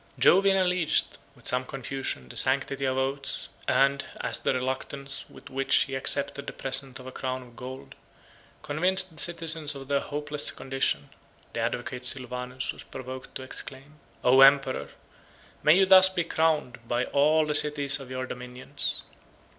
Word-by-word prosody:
Jovian 195 +1 +5
alleged, 180 -4 0 0.2
with - - -7
some 125 +1 +2
confusion, 135 - -5
the - - -12
sanctity 135 +1 +2
of 130 0 0
oaths; 135 +1 -3 0.2
and, 140 0 +3 0.2
as - - -1
the - - 0
reluctance 135 +2 -4
with - - -14
which 135 +1 +2
he 135 - -8
accepted 140 +1 0
the - - -5
present 135 -1 0
of 130 - -12
a 130 - -7
crown 130 0 -4
of 120 -1 -17
gold, 130 +2 -9 0.7
convinced 185 +5 +1
the - - -1
citizens 165 -3 +1
of 135 0 -9
their 140 -1 +2
hopeless 150 0 -1
condition, 130 - -2 0.4
the - - -3
advocate 120 +2 -3
Sylvanus 125 0 -2
was - - -12
provoked 130 0 -9
to 130 - -5
exclaim, 135 +3 -9 0.2
"O 130 +2 +6
emperor! 135 -1 +5 0.7
may 155 +4 +6
you 195 - +5
thus 190 0 +8
be 180 -2 -1
crowned 160 -6 0
by 120 +2 0
all 155 +2 +3
the 150 - -1
cities 145 -1 +4
of 135 -2 -10
your 130 0 -4
dominions!" 125 0 -5
135 Hz, 160 wpm, -27 LUFS, 130-150 Hz, 0.7 s, thus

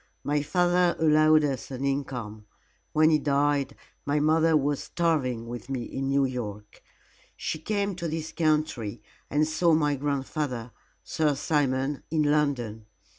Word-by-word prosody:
My 145 0 +1
father 175 +2 +2
allowed 155 0 +5
us 135 -4 -2
an 135 0 -4
income. 125 -6 -3 0.4
When 155 +1 +4
he 155 - +4
died, 145 -1 +1 0.3
my 145 +1 0
mother 160 +1 +4
was 145 0 0
starving 135 -9 0
with 120 +1 -8
me 130 -3 -2
in 135 +3 -4
New 140 0 +2
York. 105 -5 -6 0.6
She 155 - -3
came 200 +3 -1
to 170 - -3
this 160 0 -4
country 155 -9 -1 0.3
and 150 +2 +2
saw 160 +1 +3
my 150 -2 +2
grandfather, 135 -3 -3 0.3
Sir 150 -2 0
Simon, 135 -1 0
in 155 -1 +1
London. 135 -8 0
145 Hz, 140 wpm, -27 LUFS, 130-155 Hz, 0.6 s, allowed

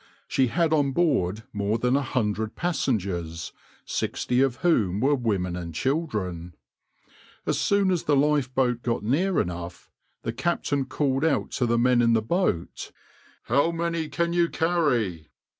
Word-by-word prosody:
She 130 - +2
had 165 +5 +1
on 140 -3 +2
board 110 - +1
more 105 +1 0
than 125 +2 +1
a 140 - +2
hundred 110 -4 -2
passengers, 95 - -2 0.3
sixty 125 +1 -1
of 135 -3 +2
whom 105 - +2
were 135 +5 +3
women 100 -9 -1
and 85 -3 -6
children. 95 - -2 0.9
As - - 0
soon 200 -2 +2
as 175 -3 -1
the 145 - +3
lifeboat 130 -4 +1
got 115 -3 -2
near 170 - +1
enough, 85 0 -5 0.3
the 115 - -3
captain 145 -2 -1
called 135 0 0
out 160 -3 +1
to 125 - 0
the 120 0 +2
men 125 0 +4
in 115 -1 +4
the 110 - +3
boat, 140 - -1 0.5
"How 140 +7 +2
many 170 -1 -2
can 170 0 -1
you 170 -1 +2
carry?" 125 - 0
125 Hz, 150 wpm, -25 LUFS, 105-155 Hz, 0.9 s, men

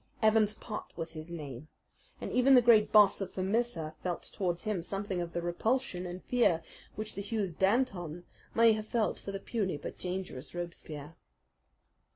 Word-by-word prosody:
Evans 215 -1 +4
Pott 215 -1 -7
was 165 -1 -4
his 155 0 -8
name, 150 -4 -7 0.5
and - - -5
even 260 +2 +6
the 250 - +8
great 225 -3 +6
Boss 205 -2 +6
of 195 - -5
Vermissa 190 -5 -1
felt 180 -2 -3
towards 175 -3 -1
him 210 -5 -1
something 195 0 -3
of 170 0 -5
the 170 - -2
repulsion 185 +2 0
and 180 +1 -7
fear 205 -10 +2 0.3
which 215 0 -3
the 200 - -4
huge 200 -4 -2
Danton 190 -6 +1 0.3
may 230 -1 +7
have 215 0 -4
felt 225 -2 0
for 200 - -6
the 195 - -4
puny 195 -6 -2
but 145 - -7
dangerous 180 -6 -5
Robespierre. 165 -3 -6
190 Hz, 170 wpm, -31 LUFS, 170-215 Hz, 0.5 s, the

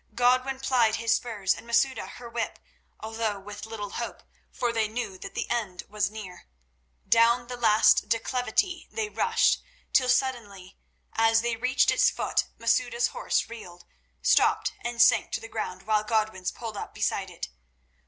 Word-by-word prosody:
Godwin 255 +2 +2
plied 245 -5 +2
his 230 0 +1
spurs 210 -6 0
and - - -11
Masouda 260 +3 +1
her 245 - -10
whip, 230 0 -3 0.4
although 220 -2 -2
with 205 +2 -9
little 210 -3 -6
hope, - - -5 0.3
for 240 -1 -1
they 225 -2 +1
knew 220 -3 -4
that 195 - -9
the - - -2
end 210 -7 -2
was 210 -2 0
near. 205 - -10 0.6
Down 235 +1 +4
the 245 +1 -6
last 215 -2 +4
declivity 250 - 0
they 440 -2 -3
rushed, - - +2 0.3
till 255 -1 +4
suddenly, 220 -8 -1 0.4
as 225 0 +4
they 235 -1 0
reached 255 +4 +2
its - - +4
foot, - - 0
Masouda's 235 +1 +1
horse - - -1
reeled, 180 -7 -11 0.4
stopped, - - +3
and 240 0 -4
sank 230 - +5
to - - 0
the 225 - -9
ground, 200 -4 -5
while 215 +1 +1
Godwin's 215 -4 0
pulled 225 -3 -7
up - - -7
beside - - -1
it. - - -7
225 Hz, 160 wpm, -27 LUFS, 210-245 Hz, 0.6 s, sank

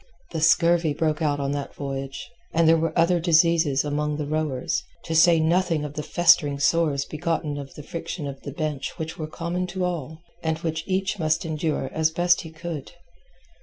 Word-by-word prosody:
The 160 - -3
scurvy 165 -1 +4
broke 155 0 0
out 145 -2 +1
on 140 0 -1
that 145 -1 -4
voyage, 135 -1 -5 0.3
and 165 0 +4
there 165 - +7
were 165 0 0
other 170 +1 +4
diseases 165 -4 +3
among 150 0 -1
the 150 - -3
rowers, 150 -3 -1 0.2
to 165 - -4
say 165 +1 +6
nothing 165 -1 +1
of 145 - -6
the 150 - -3
festering 155 -3 +4
sores 145 -1 +2
begotten 155 -2 -2
of 135 -1 -9
the 150 - -9
friction 165 0 -5
of 140 -1 -6
the 140 - -6
bench 150 -2 -4
which 160 +2 -5
were 155 - -3
common 170 +3 -3
to 180 0 -2
all, 160 -4 -4 0.2
and 160 -1 -1
which 160 -1 -2
each 190 +1 -1
must 155 +2 +1
endure 155 -3 -1
as 160 0 +2
best 175 +2 +2
he 160 - -9
could. 160 -2 -7
160 Hz, 190 wpm, -24 LUFS, 150-170 Hz, 0.3 s, there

